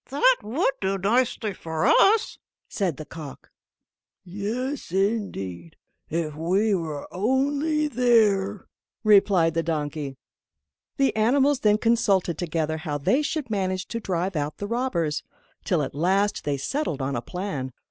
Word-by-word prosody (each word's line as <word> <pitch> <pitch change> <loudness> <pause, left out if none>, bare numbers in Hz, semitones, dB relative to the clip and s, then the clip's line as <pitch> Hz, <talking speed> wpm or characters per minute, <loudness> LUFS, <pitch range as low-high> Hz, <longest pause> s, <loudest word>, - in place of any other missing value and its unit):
"That - - +4
would 265 - 0
do 195 0 0
nicely 220 +1 +1
for 160 0 -3
us," 395 - +4 0.3
said 185 -8 -2
the 155 - -7
cock. 150 -4 -10 0.7
"Yes, 215 - -4
indeed, 190 - -2 0.3
if 160 -1 -2
we 190 +7 +1
were 160 -6 -3
only 285 - +1
there," 215 -6 +2 0.4
replied 195 -6 +5
the 165 - +1
donkey. 150 -3 -3 0.8
The 275 -4 +2
animals 265 +5 +3
then 210 -4 +3
consulted 205 -7 +1
together 160 -2 -1
how 155 -2 -3
they 250 - +2
should 300 -5 -3
manage 185 -2 -1
to 230 - -3
drive 185 -2 -2
out 150 0 -2
the 205 - -4
robbers, 205 -10 -1 0.4
till 175 -7 +1
at 135 - -5
last 190 +7 +1
they 145 -1 0
settled 155 - -2
on 135 +1 -2
a 120 - -2
plan. 150 - -4
195 Hz, 135 wpm, -25 LUFS, 160-235 Hz, 0.8 s, replied